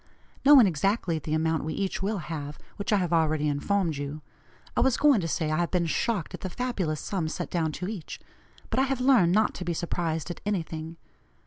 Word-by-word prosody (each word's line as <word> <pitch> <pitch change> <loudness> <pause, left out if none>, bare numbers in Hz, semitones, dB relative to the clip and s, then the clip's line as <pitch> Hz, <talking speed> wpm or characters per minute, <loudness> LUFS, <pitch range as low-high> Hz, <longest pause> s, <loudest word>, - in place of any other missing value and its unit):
Knowing 275 -4 +8
exactly 185 0 0
the 155 +1 -2
amount 160 0 0
we 155 - -3
each 195 -1 -2
will 205 +2 -1
have, 150 -3 -5 0.2
which 200 - -3
I 210 - +5
have 180 -3 -1
already 155 -2 +2
informed 160 +2 0
you, 145 +2 -5 0.5
I - - +1
was 265 -2 +3
going 285 -8 +5
to 165 - -2
say, 160 -1 -1
I 155 - +1
have 175 -1 0
been 180 -2 +1
shocked 200 - -1
at - - -7
the 185 - -3
fabulous 185 -10 -2
sum 180 -5 -2
set - - -5
down 160 -3 0
to 180 - -4
each, 200 -6 -6 0.5
but - - +1
I - - +4
have 270 -1 -1
learned 250 -10 +5
not 215 +4 +3
to - - -6
be 170 -1 -1
surprised 165 -1 -2
at - - -8
anything. 165 -5 -3
170 Hz, 215 wpm, -27 LUFS, 155-205 Hz, 0.5 s, Knowing